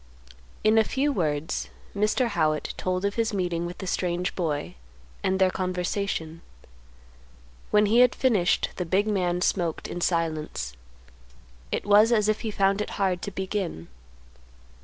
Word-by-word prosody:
In 215 +1 +5
a - - +5
few 275 +6 0
words 150 - -1 0.3
Mr. 215 +4 +1
Howitt 155 -6 0
told 185 +1 -1
of 200 - 0
his 225 -2 0
meeting 175 -2 -1
with 175 - -8
the 190 - -6
strange 180 0 -1
boy, 155 -5 -2 0.5
and 190 0 +1
their 190 -1 +3
conversation. 180 -3 -2 1.3
When 210 0 +4
he 220 +4 +4
had 250 -1 +5
finished, 210 -9 +2
the 180 - -2
big 190 +4 +2
man 180 -4 0
smoked 175 -4 0
in 175 - -5
silence. 155 - -1 1.0
It - - -2
was 210 +3 +6
as 215 -3 +3
if 215 0 +1
he 225 - -3
found 200 0 +1
it - - -3
hard 185 -3 0
to - - -4
begin. 190 - -4
185 Hz, 150 wpm, -26 LUFS, 170-210 Hz, 1.3 s, was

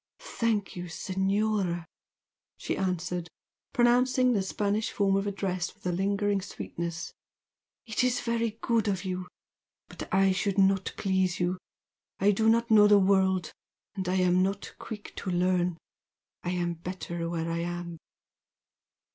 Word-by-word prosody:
"Thank 220 -4 +1
you, 180 0 -5
Senora!" 190 0 0 0.7
she - - -2
answered, 180 -2 -2 0.4
pronouncing 250 +1 +4
the 205 - +2
Spanish 205 +2 -1
form 195 -1 +1
of 195 +1 0
address 190 -3 -2
with 210 - -25
a 180 - +1
lingering 200 +2 +1
sweetness, 170 -3 -5 0.7
"It 225 +1 0
is 250 -1 +2
very 230 -2 -1
good 230 -2 +1
of 195 -2 -1
you! 185 -1 -3 0.6
But - - -8
I 195 0 +4
should 195 +1 -1
not 195 -1 +3
please 190 -2 +1
you. 180 +1 0 0.6
I 200 +2 +5
do 220 +2 +3
not 230 +1 +2
know 210 -1 +8
the 205 0 +7
world, 190 -3 +3 0.4
and 190 -4 -3
I 185 - +1
am 180 -1 +3
not 195 +1 -2
quick 210 -2 -8
to 195 - -4
learn. 180 -1 +1 0.6
I 175 - -3
am 175 -1 -1
better 170 0 -5
where 165 -1 -2
I 165 - -1
am." 175 -1 -4
190 Hz, 145 wpm, -28 LUFS, 180-205 Hz, 0.7 s, know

